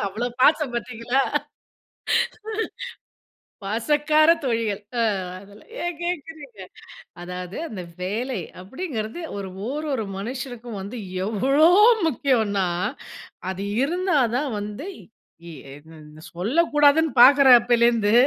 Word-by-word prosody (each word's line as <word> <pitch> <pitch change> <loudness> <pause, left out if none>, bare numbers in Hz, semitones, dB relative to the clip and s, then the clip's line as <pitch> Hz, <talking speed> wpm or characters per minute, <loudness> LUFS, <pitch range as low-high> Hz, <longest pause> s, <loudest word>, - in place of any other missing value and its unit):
அவ்ளோ 220 +5 -3
பாசம் 295 -1 +3
பாத்திங்களா? 240 +2 -1 2.4
பசக்கார 295 +9 +2
தோழிகள் 230 -5 -1 0.2
ஆ - - +3 0.4
அதலாம் 200 +1 -17
ஏன் 350 -2 -3
கேட்கிறீங்க? 320 - -6 0.6
அதாவது, 180 +1 -7
அந்த 195 -8 -7 0.2
வேலை 225 +4 -3 0.2
அப்படிங்கிறது 225 - -5 0.2
ஒரு 195 -1 -5 0.2
ஓரொரு 285 -4 -2
மனுஷனுக்கும் 240 0 -6
வந்து 200 +6 -7 0.3
எவ்ளோ 270 +9 +3 0.4
முக்கியனா, 225 - +1 0.8
அது 190 +1 -5 0.2
இருந்தா 355 +2 0 0.2
தான் 280 +1 -1
வந்து 210 - -6
இ 170 -6 -18 0.2
என் 145 +3 -14
என் 155 +1 -14
சொல்லக்கூடாதுன்னு 295 - +3
பாக்குறேன் 270 -2 +8
அப்பலேருந்து. 235 -3 +2
240 Hz, 95 wpm, -23 LUFS, 205-290 Hz, 2.4 s, பாக்குறேன்